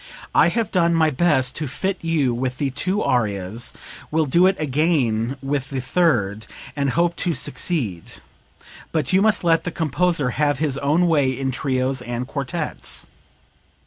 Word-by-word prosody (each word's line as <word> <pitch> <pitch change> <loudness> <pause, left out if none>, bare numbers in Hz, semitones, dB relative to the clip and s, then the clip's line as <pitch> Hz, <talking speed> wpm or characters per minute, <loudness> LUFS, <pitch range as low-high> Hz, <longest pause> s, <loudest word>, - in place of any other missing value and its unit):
I - - +5
have 230 -3 -1
done 170 -2 +2
my 160 -1 +3
best 135 -4 +2
to 155 - -2
fit 190 +8 -3
you 155 -7 +1
with 130 +1 -3
the 140 -1 -1
two 185 +10 -1
arias, 105 -2 0 0.4
will 160 0 +1
do 170 +7 +4
it 190 - 0
again 135 -5 0
with 135 -1 -2
the 135 - -3
third, 120 - 0 0.3
and 140 -1 0
hope 170 +5 +1
to 175 -3 0
succeed; 110 - -1 0.8
but 155 -2 -1
you 190 - +5
must 215 -2 +3
let 165 -1 +3
the - - -2
composer 160 -3 0
have 145 +2 +1
his 140 -2 -1
own 150 +5 +2
way 150 -6 +3
in 130 +1 -2
trios 130 0 -1
and 120 0 -4
quartets.' 145 +4 -3
145 Hz, 160 wpm, -22 LUFS, 130-170 Hz, 0.8 s, I